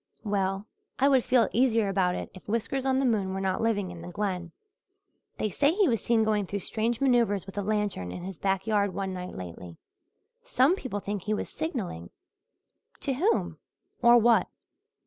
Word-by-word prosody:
"Well, 195 Hz, -1 st, -1 dB, 0.3 s
I 270 Hz, -, +4 dB
would 265 Hz, -3 st, +4 dB
feel 250 Hz, -2 st, +3 dB
easier 230 Hz, -3 st, +3 dB
about 185 Hz, -2 st, +1 dB
it -, -, -5 dB
if 185 Hz, -, -14 dB
Whiskers 245 Hz, +4 st, -1 dB
on 260 Hz, 0 st, +2 dB
the 270 Hz, -, +2 dB
moon 200 Hz, -6 st, +1 dB
were -, -, -2 dB
not 190 Hz, -1 st, -1 dB
living 205 Hz, -5 st, 0 dB
in 175 Hz, -1 st, -9 dB
the 170 Hz, -, -8 dB
Glen. 180 Hz, -2 st, -3 dB, 0.9 s
They 215 Hz, -, -1 dB
say 290 Hz, -, +2 dB
he 405 Hz, -2 st, +4 dB
was 230 Hz, -7 st, +1 dB
seen 230 Hz, -2 st, +3 dB
going 210 Hz, -3 st, +1 dB
through 200 Hz, +1 st, -3 dB
strange 225 Hz, +4 st, -1 dB
manoeuvres 235 Hz, -8 st, +2 dB
with 195 Hz, -, -10 dB
a 205 Hz, -, -1 dB
lantern 205 Hz, -, -1 dB
in 175 Hz, -, -7 dB
his 190 Hz, -3 st, -7 dB
back 195 Hz, -1 st, 0 dB
yard 205 Hz, -4 st, +1 dB
one 190 Hz, -1 st, -2 dB
night 180 Hz, 0 st, -6 dB
lately. 90 Hz, -1 st, -8 dB, 0.6 s
Some 345 Hz, -, +3 dB
people 240 Hz, -, -5 dB
think 205 Hz, 0 st, -3 dB
he 215 Hz, +3 st, -1 dB
was -, -, -4 dB
signalling." 195 Hz, -, -4 dB, 0.9 s
"To 275 Hz, -, -1 dB
whom 375 Hz, -, 0 dB, 0.4 s
or 240 Hz, 0 st, +7 dB
what?" 235 Hz, 0 st, +4 dB
210 Hz, 185 wpm, -28 LUFS, 190-240 Hz, 0.9 s, or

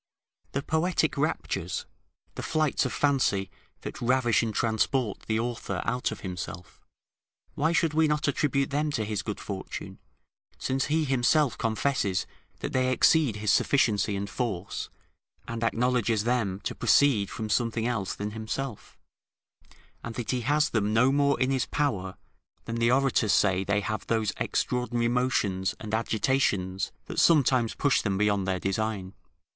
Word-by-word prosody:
The 140 Hz, -, -1 dB
poetic 160 Hz, +3 st, +1 dB
raptures, -, -, -2 dB, 0.5 s
the -, -, -6 dB
flights 155 Hz, -4 st, +1 dB
of -, -, -6 dB
fancy, 130 Hz, -9 st, +1 dB, 0.3 s
that -, -, -7 dB
ravish 120 Hz, -1 st, +3 dB
and 115 Hz, -2 st, -1 dB
transport 110 Hz, +1 st, 0 dB
the 110 Hz, 0 st, +1 dB
author 115 Hz, -5 st, -3 dB
out 125 Hz, 0 st, -1 dB
of -, -, -7 dB
himself, 90 Hz, -1 st, -7 dB, 0.7 s
why 160 Hz, +3 st, +1 dB
should 165 Hz, -2 st, +1 dB
we 160 Hz, 0 st, +3 dB
not 150 Hz, 0 st, 0 dB
attribute 140 Hz, -1 st, +1 dB
them 150 Hz, +2 st, 0 dB
to 110 Hz, -5 st, -1 dB
his 105 Hz, -1 st, -2 dB
good 105 Hz, -, -5 dB
fortune, 95 Hz, -2 st, -6 dB, 0.6 s
since 135 Hz, 0 st, -1 dB
he 155 Hz, +1 st, +1 dB
himself 135 Hz, +1 st, +2 dB
confesses 110 Hz, -4 st, 0 dB, 0.4 s
that -, -, -4 dB
they 130 Hz, 0 st, +2 dB
exceed 140 Hz, -2 st, +4 dB
his 105 Hz, -1 st, 0 dB
sufficiency 105 Hz, -5 st, +2 dB
and 100 Hz, +1 st, -3 dB
force, 100 Hz, -6 st, -3 dB, 0.6 s
and 115 Hz, 0 st, -4 dB
acknowledges 115 Hz, -2 st, +1 dB
them 110 Hz, -5 st, 0 dB
to -, -, -3 dB
proceed 120 Hz, -9 st, +3 dB
from 110 Hz, -, -5 dB
something 115 Hz, +1 st, 0 dB
else 115 Hz, -6 st, -1 dB
than 105 Hz, +1 st, -4 dB
himself, 110 Hz, +2 st, -5 dB, 1.1 s
and 115 Hz, -1 st, -6 dB
that 120 Hz, -, -3 dB
he 125 Hz, -1 st, -1 dB
has 150 Hz, +5 st, +2 dB
them 105 Hz, -1 st, 0 dB
no 125 Hz, +4 st, +5 dB
more 140 Hz, 0 st, +2 dB
in 130 Hz, +1 st, +2 dB
his 130 Hz, -1 st, 0 dB
power 95 Hz, -11 st, -1 dB, 0.5 s
than 115 Hz, 0 st, -4 dB
the 115 Hz, 0 st, +3 dB
orators 130 Hz, -4 st, +3 dB
say 95 Hz, -2 st, +3 dB
they 100 Hz, +1 st, +1 dB
have 110 Hz, +2 st, -4 dB
those 110 Hz, -2 st, 0 dB
extraordinary 120 Hz, -1 st, 0 dB
motions 100 Hz, -6 st, 0 dB
and 110 Hz, -1 st, -7 dB
agitations 110 Hz, -4 st, 0 dB
that -, -, -3 dB
sometimes 130 Hz, -7 st, +4 dB
push 145 Hz, -1 st, +2 dB
them 100 Hz, -3 st, -1 dB
beyond 100 Hz, -2 st, +1 dB
their 95 Hz, -1 st, 0 dB
design. 95 Hz, 0 st, -2 dB
115 Hz, 150 wpm, -27 LUFS, 105-135 Hz, 1.1 s, no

